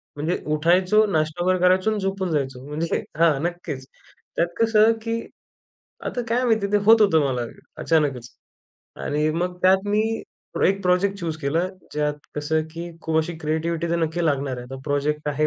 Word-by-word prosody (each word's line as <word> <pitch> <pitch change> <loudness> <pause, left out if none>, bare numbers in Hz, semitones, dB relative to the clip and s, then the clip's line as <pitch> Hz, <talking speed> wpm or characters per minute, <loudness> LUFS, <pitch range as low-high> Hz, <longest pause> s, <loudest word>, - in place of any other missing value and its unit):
म्हणजे 155 +5 -1 0.2
उठायचो, 180 +7 +4
नाश्ता 155 +2 0
वगैरे 185 0 +2
करायचो 185 +3 +3
आणि 215 - -1
झोपून 195 -2 -2
जायचो. 135 -3 -2
म्हणजे 155 +3 -2 0.2
हां, 160 -5 +4
नक्कीच. 170 -6 -4 0.5
त्यात 170 - +2
कसं, 225 -1 +5
की 230 0 -2 0.9
आता 245 - -2
काय 245 +2 +1
माहिती 220 -4 +2
आहे 200 - -8
ते 210 - +5
होत 225 +1 +7
होतं 160 -6 +4
मला 125 -2 -1 0.4
अचानकच. 140 -7 +1 0.7
आणि 150 +1 -1
मग 180 +2 -2
त्यात 190 +2 +4
मी 210 +1 +2 0.6
एक 195 +1 +1
प्रोजेक्ट 185 +2 +2
चूज 165 -3 -3
केला, 140 +4 +1 0.3
ज्यात 150 0 0 0.2
कसं, 155 +2 0
की 170 +1 -7
खूप 160 0 -1
अशी 160 +2 -1
क्रिएटिव्हिटी 160 +2 -1
तर 170 - +2
नक्की 165 +1 -1
लागणार 140 -3 0
आहे. 125 - -7
आता 135 - -6
प्रोजेक्ट 150 +1 -1
आहे 150 +1 +1
170 Hz, 170 wpm, -23 LUFS, 150-190 Hz, 0.9 s, होत